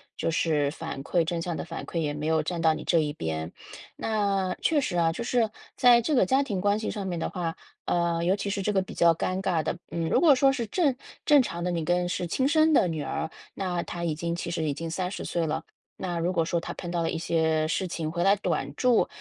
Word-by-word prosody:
就 -, -, -1 dB
是 155 Hz, -3 st, +1 dB
反 160 Hz, -2 st, -6 dB
馈 170 Hz, +3 st, +1 dB
正 170 Hz, +1 st, -2 dB
向 170 Hz, -1 st, -3 dB
的 -, -, -4 dB
反 165 Hz, 0 st, -6 dB
馈， -, -, -6 dB
也 150 Hz, -3 st, 0 dB
没 150 Hz, +1 st, -3 dB
有 160 Hz, -1 st, +2 dB
站 170 Hz, +1 st, -3 dB
到 160 Hz, -1 st, +4 dB
你 -, -, -6 dB
这 170 Hz, -, +3 dB
一 150 Hz, -1 st, 0 dB
边。 80 Hz, -, -4 dB, 0.4 s
那 200 Hz, -4 st, 0 dB
确 315 Hz, -3 st, +3 dB
实 195 Hz, -9 st, -2 dB
啊， 165 Hz, -1 st, +3 dB
就 235 Hz, -, -4 dB
是 235 Hz, -2 st, +1 dB, 0.3 s
在 245 Hz, -2 st, +6 dB
这 240 Hz, +7 st, -1 dB
个 255 Hz, -, +4 dB
家 270 Hz, +1 st, +3 dB
庭 200 Hz, -8 st, -3 dB
关 205 Hz, 0 st, +2 dB
系 215 Hz, -, -3 dB
上 200 Hz, -2 st, -4 dB
面 175 Hz, -2 st, -2 dB
的 -, -, -1 dB
话， 170 Hz, -3 st, -3 dB, 0.3 s
呃， 170 Hz, -1 st, +1 dB
尤 185 Hz, +3 st, +3 dB
其 200 Hz, 0 st, -3 dB
是 200 Hz, 0 st, -2 dB
这 210 Hz, -, 0 dB
个 190 Hz, -2 st, +2 dB
比 -, -, -10 dB
较 170 Hz, -1 st, +4 dB
尴 185 Hz, +3 st, -1 dB
尬 175 Hz, -5 st, +1 dB
的， -, -, -1 dB
嗯， 165 Hz, -1 st, -2 dB
如 -, -, +3 dB
果 315 Hz, -5 st, +7 dB
说 270 Hz, +1 st, +4 dB
是 235 Hz, -5 st, -3 dB
正 290 Hz, -, +1 dB, 0.3 s
正 295 Hz, -2 st, +7 dB
常 170 Hz, -8 st, -4 dB
的 180 Hz, -, 0 dB
你 170 Hz, -2 st, -1 dB
跟 175 Hz, +2 st, +1 dB
是 175 Hz, 0 st, -2 dB
亲 260 Hz, +10 st, +1 dB
生 315 Hz, +1 st, +4 dB
的 235 Hz, -11 st, +4 dB
女 160 Hz, -2 st, -3 dB
儿， 160 Hz, +3 st, -3 dB, 0.2 s
那 180 Hz, -3 st, -1 dB
她 170 Hz, -, -6 dB
已 165 Hz, -2 st, 0 dB
经 170 Hz, +2 st, -3 dB
其 170 Hz, 0 st, -4 dB
实 165 Hz, -2 st, -1 dB
已 145 Hz, -3 st, -1 dB
经 165 Hz, +1 st, -5 dB
30 185 Hz, +3 st, -3 dB
岁 170 Hz, -2 st, -1 dB
了。 160 Hz, +1 st, -2 dB, 0.3 s
那 175 Hz, -2 st, -3 dB
如 175 Hz, +2 st, 0 dB
果 165 Hz, -2 st, +2 dB
说 170 Hz, +1 st, 0 dB
她 -, -, -6 dB
碰 175 Hz, -, -7 dB
到 170 Hz, -1 st, -1 dB
了 165 Hz, -, 0 dB
一 -, -, -2 dB
些 160 Hz, -2 st, +1 dB
事 185 Hz, +3 st, -1 dB
情 160 Hz, -2 st, -3 dB
回 175 Hz, 0 st, -1 dB
来 200 Hz, +1 st, +5 dB
短 210 Hz, -, -2 dB
住， 250 Hz, -3 st, +3 dB
175 Hz, 280 characters per minute, -27 LUFS, 165-200 Hz, 0.4 s, 果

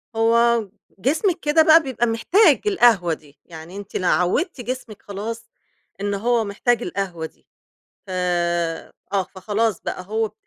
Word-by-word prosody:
هو 230 Hz, -1 st, +3 dB, 0.3 s
جسمِك 325 Hz, -, +1 dB
كده 305 Hz, +1 st, +3 dB
بقى 320 Hz, +1 st, +7 dB
بيبقى 255 Hz, -3 st, -1 dB
محتاج 295 Hz, -, +4 dB
القهوة 235 Hz, -, +4 dB
دي، 150 Hz, -2 st, -13 dB
يعني 165 Hz, +2 st, -11 dB
أنتِ 205 Hz, -1 st, -10 dB
لو 185 Hz, -, 0 dB
عوّدتِ 245 Hz, -, +1 dB
جسمِك 245 Hz, -3 st, -6 dB
خلاص 225 Hz, +3 st, -6 dB, 0.5 s
إن 205 Hz, 0 st, -1 dB
هو 230 Hz, +3 st, +1 dB
محتاج 225 Hz, +3 st, 0 dB
القهوة 180 Hz, -5 st, -4 dB
دي، -, -, -14 dB, 0.6 s
ف -, -, -13 dB, 1.0 s
آه، 195 Hz, -1 st, +2 dB
فخلاص 210 Hz, +1 st, -1 dB
بقى -, -, -4 dB
هو 220 Hz, +1 st, -1 dB
225 Hz, 140 wpm, -22 LUFS, 195-245 Hz, 1.0 s, بقى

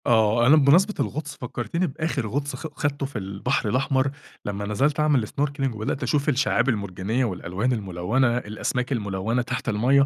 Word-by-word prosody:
آه. 115 Hz, 0 st, +4 dB
أنا 145 Hz, -, +8 dB
بمناسبة 165 Hz, +9 st, +5 dB
الغُطس 145 Hz, 0 st, -3 dB
فكرتني 125 Hz, -, -2 dB
بآخِر 140 Hz, -4 st, -2 dB
غُطس 145 Hz, +6 st, -2 dB
خ -, -, -6 dB
خَدته 145 Hz, -1 st, -1 dB
في 135 Hz, -, -9 dB
البحر 100 Hz, +4 st, -1 dB
الأحمر، 130 Hz, +3 st, +1 dB, 0.3 s
لما 100 Hz, 0 st, -3 dB
نزَلت 135 Hz, +9 st, +1 dB
أعمل 145 Hz, -7 st, +3 dB
snorkeling 140 Hz, -2 st, -1 dB
وبدأت 110 Hz, +6 st, -2 dB
أشوف 145 Hz, +4 st, +1 dB
الشّعاب 135 Hz, 0 st, +2 dB
المرجانيّة 105 Hz, +2 st, -1 dB
والألوان 95 Hz, +3 st, -2 dB
الملوّنة، 110 Hz, +5 st, 0 dB
الأسماك 125 Hz, +3 st, -2 dB
الملوّنة 105 Hz, 0 st, -1 dB
تحت 120 Hz, -, -3 dB
المَيَّة. 130 Hz, +6 st, +4 dB
125 Hz, 155 wpm, -24 LUFS, 105-140 Hz, 0.3 s, أنا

